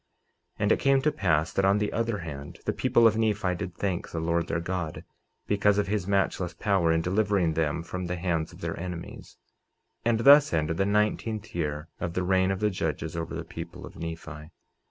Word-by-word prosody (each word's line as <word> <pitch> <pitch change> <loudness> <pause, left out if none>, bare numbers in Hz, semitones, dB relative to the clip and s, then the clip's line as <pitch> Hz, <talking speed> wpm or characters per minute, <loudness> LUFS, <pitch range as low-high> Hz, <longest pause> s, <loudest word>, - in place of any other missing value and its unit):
49:28 - - -3
And 105 - +3
it - - +3
came 135 -1 +3
to 150 - +3
pass, 80 - +1
that 95 - +1
on 100 +1 +4
the 105 0 -1
other 115 -1 0
hand, 75 -5 -7
the - - 0
people 115 - +3
of 110 0 +4
Nephi 105 -4 +1
did 90 -1 -5
thank 95 -3 -2
the 85 - -4
Lord 85 +1 0
their 85 - -1
God, 85 -2 -4 0.4
because 105 0 +2
of 105 - +2
his 100 -1 -2
matchless 95 -3 0
power 95 -5 +2
in 80 0 +2
delivering 95 -2 +1
them 80 0 -1
from 90 +1 -5
the 90 - -2
hands 85 -2 -1
of - - -14
their - - -3
enemies. 90 -1 -7 0.7
49:29 - - +4
And 110 - +1
thus 145 0 +7
ended 80 0 0
the 95 - +1
nineteenth 105 +1 0
year 75 -2 -2
of 85 -1 -3
the 90 - 0
reign 95 0 +2
of 95 +1 -2
the 105 0 +2
judges 80 -2 -3
over 85 0 -4
the - - -4
people - - -8
of - - -12
Nephi. 80 -2 -7
90 Hz, 215 wpm, -27 LUFS, 85-105 Hz, 0.7 s, thus